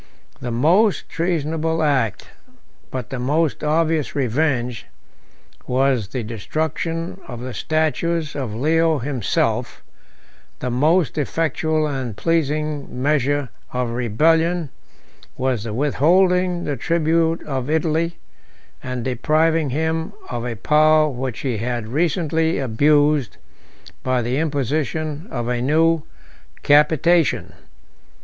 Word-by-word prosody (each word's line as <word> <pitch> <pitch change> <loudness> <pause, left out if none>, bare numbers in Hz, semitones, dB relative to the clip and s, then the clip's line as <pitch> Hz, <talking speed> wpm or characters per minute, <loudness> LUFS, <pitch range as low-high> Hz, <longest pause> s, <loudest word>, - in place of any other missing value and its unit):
The 125 - -4
most 170 - +2
treasonable 160 -1 -1
act, 125 -8 0 0.6
but 130 -3 -6
the 130 - -3
most 150 +5 0
obvious 155 0 +1
revenge, 125 -3 0 0.8
was 130 -4 +1
the 125 +3 -4
destruction 165 - -3
of 120 -2 -7
the 125 0 -6
statues 160 +1 -1
of 130 -7 -4
Leo 160 +5 +2
himself: 130 -3 -1 0.7
the 125 - -3
most 155 +6 +2
effectual 155 +1 0
and 130 -7 -3
pleasing 150 -4 -1
measure 145 -2 +1 0.2
of 125 -1 -1
rebellion, 160 +8 +1 0.7
was 125 -4 -1
the 115 - -4
withholding 175 - +2
the 145 - -2
tribute 165 +3 +1
of 135 -2 -3
Italy, 160 +1 0 0.6
and 125 -2 -4
depriving 155 +5 +1
him 160 +4 -1 0.2
of 120 -1 -3
a 120 -2 -3
power 155 +5 +4
which 130 -3 -4
he 125 -5 -1
had 120 -1 -3
recently 160 +3 0
abused 145 +1 +2 0.6
by 130 -2 0
the 125 +3 -1
imposition 155 - -2
of 120 -2 -3
a 120 -1 -1
new 160 +4 +3 0.6
capitation. 160 +3 +3
150 Hz, 110 wpm, -21 LUFS, 125-160 Hz, 0.8 s, power